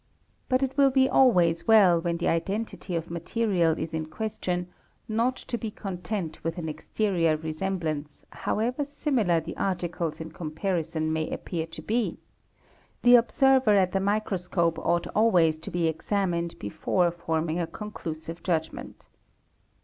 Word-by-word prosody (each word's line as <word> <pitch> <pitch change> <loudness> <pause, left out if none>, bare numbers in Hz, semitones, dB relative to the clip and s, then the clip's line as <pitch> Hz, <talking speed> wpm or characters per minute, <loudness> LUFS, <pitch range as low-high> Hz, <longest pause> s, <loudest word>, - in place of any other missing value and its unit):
But 255 0 +2
it 265 +1 -2
will 275 -1 +6
be 265 0 +4
always 175 -12 +4
well 195 -7 +6
when 170 0 -1
the 170 - -1
identity 195 +2 -2
of 165 -1 -2
© - - -18
material 170 -2 +1
is 160 - -4
in 160 -1 -2
question 180 -1 -3 0.4
not 230 +4 +1
to 235 -2 -5
be 225 - -3
content 185 -4 -5
with 165 +1 -2
an 165 -2 -4
exterior 165 0 0
resemblance 155 -2 -4
~ - - -40 0.2
however 245 +6 0
similar 270 - +1
the 165 +1 -7
articles 175 -3 -2
in 160 0 -7
comparison 160 -1 -2
may 160 0 -1
appear 165 -3 -4
to 165 - -10
be; 230 +1 -1 0.9
the 245 - +7
observer 255 -1 +5
at 185 -2 +3
the 195 - +1
microscope 190 -4 0
ought 170 0 +1
always 175 -8 +3
to 160 - -8
be 175 -1 0
examined 170 +1 -1
before 175 - 0
forming 165 -1 -2
a 170 - -1
conclu: 210 -7 -6
sive 165 +2 -9
judgment. 160 -3 -3
175 Hz, 150 wpm, -27 LUFS, 165-215 Hz, 0.9 s, the